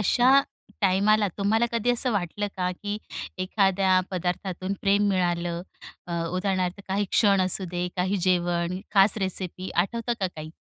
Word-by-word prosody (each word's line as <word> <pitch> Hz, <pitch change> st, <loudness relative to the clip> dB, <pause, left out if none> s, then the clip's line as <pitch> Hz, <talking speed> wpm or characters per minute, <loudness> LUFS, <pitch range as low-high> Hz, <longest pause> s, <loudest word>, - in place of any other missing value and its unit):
अशा 255 Hz, +6 st, +5 dB, 0.4 s
टायमाला 205 Hz, +2 st, +3 dB
तुम्हाला 220 Hz, +4 st, +2 dB
कधी 235 Hz, +1 st, +1 dB
असं 245 Hz, +1 st, +2 dB
वाटलं 205 Hz, +1 st, -2 dB
का, 180 Hz, -1 st, 0 dB
की 205 Hz, +3 st, -5 dB, 0.4 s
एखाद्या 190 Hz, -1 st, +2 dB
पदार्थातून 185 Hz, +1 st, -3 dB
प्रेम 200 Hz, +1 st, +3 dB
मिळालं 175 Hz, -2 st, 0 dB, 0.4 s
अ, 175 Hz, -, -6 dB
उदाहरणार्थ 185 Hz, +1 st, -1 dB
काही 200 Hz, +2 st, 0 dB
क्षण 200 Hz, -3 st, +4 dB
असू 185 Hz, +1 st, +1 dB
दे, 175 Hz, 0 st, -2 dB
काही 185 Hz, +2 st, 0 dB
जेवण, 175 Hz, 0 st, 0 dB
खास 195 Hz, +1 st, +5 dB
रेसिपी 185 Hz, -1 st, -3 dB
आठवतं 230 Hz, +7 st, 0 dB
का 190 Hz, -, +2 dB
काही? 155 Hz, 0 st, -7 dB
190 Hz, 140 wpm, -25 LUFS, 180-205 Hz, 0.4 s, अशा